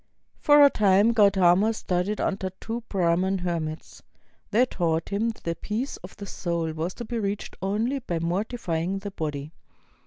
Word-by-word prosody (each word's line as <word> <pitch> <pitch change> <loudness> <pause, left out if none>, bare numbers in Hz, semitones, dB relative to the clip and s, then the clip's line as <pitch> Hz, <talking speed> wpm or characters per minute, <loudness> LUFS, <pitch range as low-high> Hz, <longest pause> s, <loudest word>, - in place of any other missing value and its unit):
For 290 -1 +6
a 280 - +5
time 205 +1 +4
Gautama 200 -1 +4
studied 185 +2 -1
under 190 -1 -1
two 230 +1 -4
Brahman 185 +1 +1
hermits. 165 -3 -4 0.5
They 235 +4 +4
taught 165 -8 -1
him 210 +3 0
that 225 - -8
the 170 - -1
peace 215 - -4
of 180 - -12
the 200 - -7
soul 170 -4 -2
was 165 +3 -3
to 240 - -6
be 235 +1 -3
reached 200 -1 -3
only 220 +8 0
by 175 -9 -3
mortif\ 180 +3 -2
ing 185 +4 -1
the 200 +1 -6
body. 150 -4 -4
195 Hz, 165 wpm, -26 LUFS, 170-215 Hz, 0.5 s, For